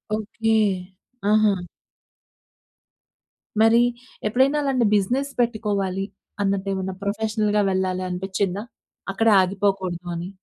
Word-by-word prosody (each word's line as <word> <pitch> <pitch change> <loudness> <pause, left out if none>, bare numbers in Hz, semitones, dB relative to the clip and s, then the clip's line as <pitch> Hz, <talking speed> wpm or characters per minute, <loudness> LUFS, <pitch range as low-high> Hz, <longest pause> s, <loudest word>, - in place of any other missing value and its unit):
Okay. 220 +1 -1 0.8
ఆహా! 215 -1 +5 2.1
మరి 225 +1 +6 0.5
ఎప్పుడైనా 265 +7 +3
అలాంటి 260 -4 +2
బిజినెస్ 255 +8 0
పెట్టుకోవాలి 205 -5 -1 0.4
అన్నట్టు 195 0 0
ఏమన్నా 190 0 -3
ప్రొఫెషనల్‌గా 210 0 0
వెళ్ళాలనిపిచ్చిందా? 185 +1 -1 0.5
అక్కడే 225 +2 +4
ఆగిపోకూడదు 190 -2 -1
అని. 170 +2 -5
200 Hz, 80 wpm, -23 LUFS, 190-220 Hz, 2.1 s, మరి